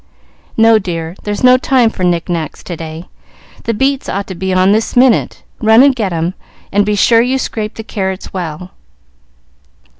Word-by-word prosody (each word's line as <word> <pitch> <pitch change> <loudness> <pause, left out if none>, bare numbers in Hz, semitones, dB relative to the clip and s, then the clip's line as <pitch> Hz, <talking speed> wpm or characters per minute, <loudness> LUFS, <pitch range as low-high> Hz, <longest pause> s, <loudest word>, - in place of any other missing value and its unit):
"No, 225 0 +5
dear; 170 -3 -5
there's 205 +1 -3
no 255 0 +7
time 255 -3 +2
for 185 - -6
knick 175 -2 0
knacks 165 -4 -4
to 175 - -6
day. 160 +1 -8 0.6
The 230 - 0
beets 270 +3 0
ought 200 +1 -2
to - - -4
be 190 +2 -3
on 185 +1 +3
this 220 +2 0
minute. 250 -1 +2 0.2
Run 220 +2 +5
and 275 -2 +4
get 210 -6 -2
'em, 170 +1 -2 0.4
and 205 +1 +2
be 210 - +1
sure 230 +3 +4
you 255 +3 0
scrape 215 -4 -4
the 225 - -7
carrots 190 -3 -4
well." 180 0 -6
205 Hz, 180 wpm, -14 LUFS, 180-230 Hz, 0.6 s, no